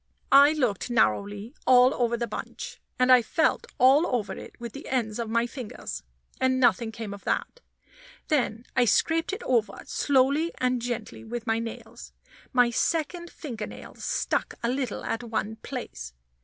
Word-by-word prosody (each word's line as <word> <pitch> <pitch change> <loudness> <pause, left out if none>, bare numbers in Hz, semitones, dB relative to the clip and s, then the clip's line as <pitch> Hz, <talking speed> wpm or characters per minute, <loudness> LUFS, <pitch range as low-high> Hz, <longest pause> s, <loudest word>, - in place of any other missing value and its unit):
I 280 +2 +8
looked 250 -9 0
narrowly 205 - +1
all 255 0 +7
over 235 -1 0
the 235 - -1
bunch, 215 - -7 0.2
and 255 0 +4
I 250 -1 +8
felt 315 +7 +1
all 270 +7 +6
over 235 -5 -1
it - - -11
with 235 -2 -7
the 280 - -9
ends 235 -4 -1
of 230 -2 -3
my 230 +1 +2
fingers, 230 - -6 0.4
and 260 0 +2
nothing 240 -2 +3
came 220 -2 -6
of 200 - -10
that. - - -1 0.7
Then 245 -5 0
I 250 -2 +4
scraped 325 - +2
it 400 +4 -5
over 235 -4 0
slowly 285 +4 +2
and 250 -1 0
gently 240 -2 -4
with 230 +1 -5
my 225 -1 +1
nails. 230 0 -8 0.4
My 245 -2 +4
second 340 +6 -1
finger 230 -9 -6
nail - - -10
stuck - - -2
a 235 - +1
little 255 -3 -2
at 225 - -2
one 220 -2 -3
place. 140 - -7
240 Hz, 165 wpm, -27 LUFS, 225-265 Hz, 0.7 s, I